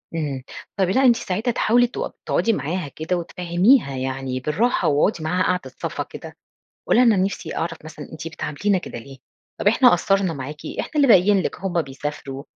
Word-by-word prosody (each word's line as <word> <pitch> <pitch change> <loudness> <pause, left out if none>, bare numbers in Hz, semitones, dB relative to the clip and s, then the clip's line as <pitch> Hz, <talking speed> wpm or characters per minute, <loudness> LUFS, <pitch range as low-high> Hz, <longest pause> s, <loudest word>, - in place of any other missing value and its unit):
إمم، 145 -5 -3 0.3
طَب 190 -2 +2
لأ 255 +8 +3
أنتِ 240 -2 +6
ساعتها 225 +1 -2
تحاولي 240 +2 +3
تق 240 - -5
تقعدي 230 - +1
معاها 170 -1 -3
كده 160 +5 -3
وتفهّميها 175 - +2
يعني 130 0 -3
بالراحة، 160 - 0
واقعدي 155 +4 +1
معاها 180 +4 +1
قعدة 185 0 -1
صَفا - - -3
كده، - - -11 0.5
قولي - - +4
لها 250 - +6
أنا 185 - +2
نِفْسي 190 -4 -4
أعرف 165 0 -3
مثلًا 155 - -10
أنتِ 160 +1 -7
بتعاملينا 165 +5 -1
كده 175 - -7
ليه؟ 135 +3 -12 0.4
طَب - - 0
إحنا 245 +4 +6
قَصّرنا 190 0 +2
معاكِ؟ 140 +1 -6 0.2
إحنا - - -3
اللي 290 -2 +4
باقيين 200 -2 +6
لِك، - - -4
هُم 175 -2 0
بيسافروا، 140 -1 -6
175 Hz, 180 wpm, -22 LUFS, 150-205 Hz, 0.5 s, أنتِ